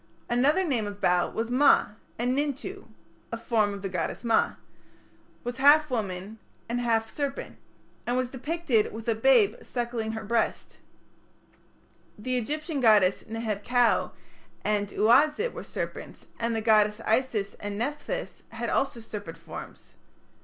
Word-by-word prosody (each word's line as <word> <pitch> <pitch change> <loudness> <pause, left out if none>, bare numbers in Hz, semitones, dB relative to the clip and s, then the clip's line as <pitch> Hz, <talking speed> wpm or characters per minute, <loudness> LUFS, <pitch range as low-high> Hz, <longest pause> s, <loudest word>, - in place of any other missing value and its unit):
Another 280 +10 +3
name 240 -9 0
of 205 0 -7
Bau 180 -2 +2
was 230 +2 -3
Ma, 275 +4 +5 0.3
and 245 +2 0
Nintu, 295 +7 -3 0.4
"a 230 - -2
form 225 -3 +1
of 200 -1 -7
the - - -1
goddess 180 +3 -3
Ma", 230 -1 +2 0.9
was 245 0 -4
half 290 +2 +6
a - - -2
woman 200 -1 -3 0.3
and 240 +2 -1
half 225 -2 +1
a - - -15
serpent, 280 -2 -4 0.5
and 245 +1 +1
was 255 -1 -1
depicted 270 -4 0
with 225 +1 -8
"a 230 - +3
babe 225 -2 +4
suckling 235 -2 -3
her 220 - -5
breast" 230 +2 0
(Chapter - - -32
IV). 210 - -13
The 255 +1 0
Egyptian 300 +5 -2
goddesses 210 -6 +4
Neheb 220 -2 -3
kau 245 0 +2 0.5
and 205 -1 +1
Uazit 295 - +3
were - - -7
serpents, - - -6
and 230 0 0
the 225 - -1
goddesses 215 -1 +3
Isis 220 -3 +1
and 205 0 -5
Nepthys 295 - -4
had - - -4
also 270 -3 0
serpent 205 -7 -7
forms. 165 -1 -10
230 Hz, 155 wpm, -27 LUFS, 210-265 Hz, 0.9 s, half